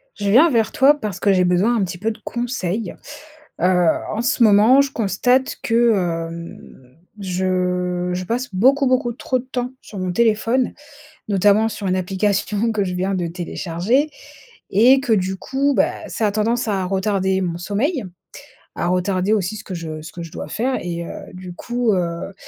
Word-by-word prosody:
Je 200 -1 -2
viens 285 +11 +6
vers 230 -4 +1
toi 275 +3 +5
parce 210 -6 -4
que 200 - +3
j'ai 185 -1 +3
besoin 185 +7 +2
un 215 - +1
petit 180 -1 -4
peu 220 +4 -1
de 215 - -10
conseils. 230 -5 -3 0.7
Heu, 180 -1 +3 0.3
en 220 - -2
ce 240 0 +2
moment, 220 +5 +6
je 280 -1 -1
constate 245 +4 +1
que, 235 0 +3 0.4
hem, 165 -6 -11 0.2
je 180 -1 -1
je 180 +1 -3
passe 245 +6 -2
beaucoup, 265 +8 +3
beaucoup 255 -1 +1
trop 255 +2 -2
de 245 - -10
temps 250 -1 -3
sur 205 - -9
mon 185 -1 -2
téléphone, 230 +4 +1 0.6
notamment 205 +2 +3
sur 205 -2 -6
une 185 0 +1
application 200 +4 0
que 210 -2 0
je 180 -1 -3
viens 190 +2 -1
de 180 -2 -1
télécharger 180 - -1 0.6
et 245 +7 +5
que 265 -4 -1
du 190 -2 +1
coup, 275 +7 0
bah, - - 0
ça 220 - -1
a 205 - 0
tendance 225 +3 0
à 195 -3 0
retarder 190 0 0
mon 175 -2 -2
sommeil, 230 - -1 0.7
à - - -2
retarder 185 +2 +1
aussi 205 -1 -1
ce 215 - -9
que 190 - -7
je 160 -2 -6
ce 155 0 -10
que 170 - -7
je 165 - -10
dois - - -6
faire 255 +4 -1
et 170 -1 -4
heu, - - -7 0.2
du 185 -1 -9
coup, 240 +3 -1
heu, 170 +1 -2
200 Hz, 185 wpm, -20 LUFS, 180-235 Hz, 0.7 s, viens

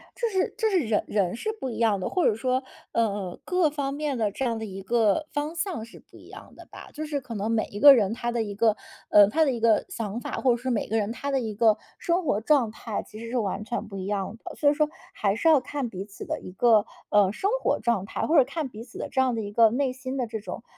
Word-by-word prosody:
就 475 - -1
是 380 -3 0
就 445 -2 +1
是 380 - +3
人 220 -8 +1
人 195 -4 0
是 435 - -3
不 265 - -4
一 - - -6
样 220 -3 +2
的， 180 - -2
或 365 - +1
者 210 - +3
说， 255 +3 0 0.3
呃， 205 -5 -1
各 360 -4 +2
方 280 -2 -3
面 290 -2 -2
的 215 -3 0
这 270 - -4
样 230 -3 -1
的 220 - -4
一 195 -2 -7
个 230 +7 +2
方 295 +3 -3
向 335 - -3
是 230 - -14
不 - - -19
一 - - -15
样 - - -12
的 - - -13
吧。 - - -11
就 310 +1 -5
是 290 -2 -3
可 240 -3 -8
能 205 +2 -2
每 225 -1 +1
一 205 - -6
个 285 +3 +10
人 210 -2 +1
他 240 +1 -3
的 235 - 0
一 205 -2 -5
个， 215 +1 +2 0.3
呃， 205 -1 +8
他 315 +7 +3
的 275 - +2
一 235 - -5
个 225 -2 +3
想 230 - -4
法， - - -7
或 260 - +2
者 240 - +2
是 255 +2 -4
每 230 -4 0
个 225 - +1
人 210 +1 -1
他 280 +3 -4
的 270 - +2
一 220 -4 -4
个 220 0 +4 0.2
生 345 +1 0
活 210 -7 +1
状 255 -3 +3
态 220 -1 -4
其 215 - -13
实 230 - -7
是 250 - -2
完 205 -2 -2
全 235 +1 -4
不 195 - -9
一 185 - -5
样 200 +1 -2
的。 - - -37
所 290 - +3
以 - - +3
说 300 0 +1 0.2
还 200 -1 0
是 280 - 0
要 310 -4 +7
看 280 -4 -4
彼 190 -2 -6
此 205 -1 -10
的 - - -3
一 - - -10
个， 220 +2 +4 0.2
呃， 205 -2 +4
生 385 - -1
活 - - +1
状 220 -4 0
态， - - -3
或 320 0 +3
者 275 - +8
看 275 +1 -4
彼 225 0 -9
此 - - -13
的 - - -4
这 265 - +1
样 255 -2 +1
的 225 - -2
一 205 -1 -6
个 225 +1 +5
内 255 +2 0
心 260 +1 -5
的 250 - 0
这 220 -1 -5
种 215 - -7
235 Hz, 310 characters per minute, -26 LUFS, 210-280 Hz, 0.3 s, 个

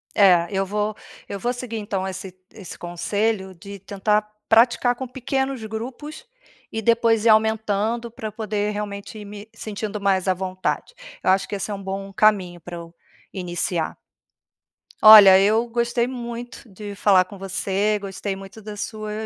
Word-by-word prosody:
É, 180 -4 +5
eu 195 -1 0
vo 210 +2 -2 0.3
eu 200 - -5
vou 240 +4 -1
seguir 245 -2 -6
então 200 -3 -3
esse 190 0 -6 0.2
esse 200 -6 -10
conselho 190 +3 -2
de 200 +3 -10
tentar 210 +2 0 0.2
praticar 240 +2 +4
com 260 +1 -6
pequenos 265 0 -2
grupos 255 - -7 0.5
e 225 - -3
depois 230 0 +3
ir - - +6
aumentando, 220 +1 +1
pra 220 -1 -6
eu - - -13
poder 210 -1 -2
realmente 205 +1 -6
ir 210 - -9
me 205 +1 -10
sentindo 210 -1 -5
mais 195 -1 +1
à 185 - +4
vontade. 185 - -3 0.3
Eu - - +2
acho 190 +1 +2
que - - -4
esse 200 +2 -4
é 200 - -3
bom 195 0 -5
caminho 190 -4 +2
pra 175 +2 -8
eu 170 0 -10 0.4
iniciar. 175 -3 -2 1.1
Olha, 205 -3 +10
eu 215 +4 +3
gostei 235 0 0
muito 240 -1 -7
de 205 0 -9
falar 195 -2 +4
com 200 +2 -12
você, 195 +2 -1
gostei 195 0 -4
muito 195 +3 -11
da 210 0 -7
sua 215 0 -5
210 Hz, 160 wpm, -23 LUFS, 195-225 Hz, 1.1 s, Olha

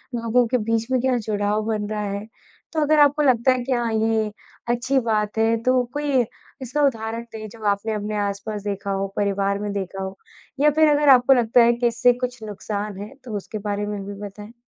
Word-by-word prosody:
लोगों 235 +1 +2
के 250 +2 +1
बीच 225 0 -1
में 255 - +3
क्या 255 -1 +2
जुड़ाव 210 -1 -1
बन 210 -2 -1
रहा 210 -1 -2
है? 200 +1 -4 0.5
तो 315 - +1
अगर 300 +1 +3
आपको 290 +1 +5
लगता 255 -2 +4
है 255 -1 0
कि 265 - -5
हाँ, 240 -2 +1
ये 220 -1 +1 0.4
अच्छी 250 +3 +1
बात 215 -2 -1
है 225 +1 +3
तो 255 0 +3
कोई 290 -3 +1 0.4
इसका 260 +4 -2
उदाहरण 225 -2 -2
दें 215 -1 -6
जब 225 0 -13
आपने 205 +2 0
अपने 210 0 -3
आस-पास 205 +1 -3
देखा 200 -1 -3
हो 195 0 -1
परिवार 200 0 0
में 205 0 -3
देखा 195 -1 -4
हो 190 0 -6 0.4
या 295 +2 +5
फ़िर 310 +1 +4
अगर 290 0 +3
आपको 260 0 +7
लगता 240 -1 +4
है 235 +1 +5
कि 240 0 +1
इससे 235 +1 +3
कुछ 250 -1 -5
नुकसान 205 -1 -5
है 210 +6 -8
तो 225 -4 -6
उसके 210 +2 -6
बारे 205 0 -1
में 205 -1 -4
भी 205 - -6
बताएँ। 205 +2 -10
225 Hz, 215 wpm, -23 LUFS, 205-250 Hz, 0.5 s, आपको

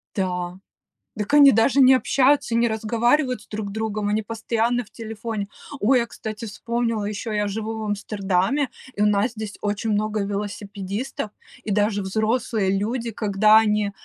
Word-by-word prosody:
Да. 180 -2 -2 0.6
Дак 210 +5 -4
они 285 -2 +9
даже 235 +5 +4
не 260 0 +8
общаются 270 -1 +2
и - - +3
не 235 - +3
разговаривают 235 +4 +1
с 210 - -18
друг 210 -1 -5
другом, 215 -1 -2
они 210 +1 +1
постоянно 225 +2 -1
в 210 - -21
телефоне. 220 -2 -5 0.3
Ой, 250 +5 +4
я, 235 - 0
кстати, 220 0 -7
вспомнила: 230 0 -2
ещё 210 +2 -4
я 210 -1 0
живу 220 +2 -4
в - - -4
Амстердаме, 205 +4 0 0.3
и - - -2
у - - +5
нас 210 +3 +2
здесь, 215 -2 -7
очень 205 +2 -2
много 215 0 0
велосипедистов 205 +3 -4 0.3
и 215 - -3
даже 205 0 +1
взрослые 220 +1 0
люди, 230 +3 -2
когда 215 0 +4
они, 210 -2 +2
215 Hz, 160 wpm, -23 LUFS, 205-230 Hz, 0.6 s, они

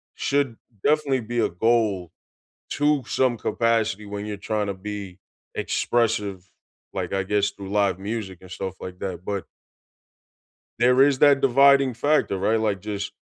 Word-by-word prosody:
should 140 -5 0 0.3
definitely 145 -4 +2
be 120 +2 -3
a 115 - +2
goal 100 -3 +1 0.6
to 145 -1 +2
some 125 -2 +1
capacity 110 -2 0
when 100 0 -5
you're 105 -1 -5
tryna 100 -3 -3
be 100 -3 -6 0.4
expressive, 105 -6 -1 0.4
like, 90 -1 -3
I 95 -1 0
guess 100 0 +1
through 100 -1 -9
live 100 -3 +1
music 100 -3 -5
and 95 -1 -14
stuff 95 -1 -5
like 90 0 -8
that. 90 -2 -5
But 100 -4 -3 1.3
there 125 +2 +5
is 140 -1 +4
that 140 -1 +5
dividing 135 0 +5
factor, 145 -5 +1
right, 110 +4 +2
like, 105 -3 0
just 100 0 -4
105 Hz, 145 wpm, -24 LUFS, 95-120 Hz, 1.3 s, there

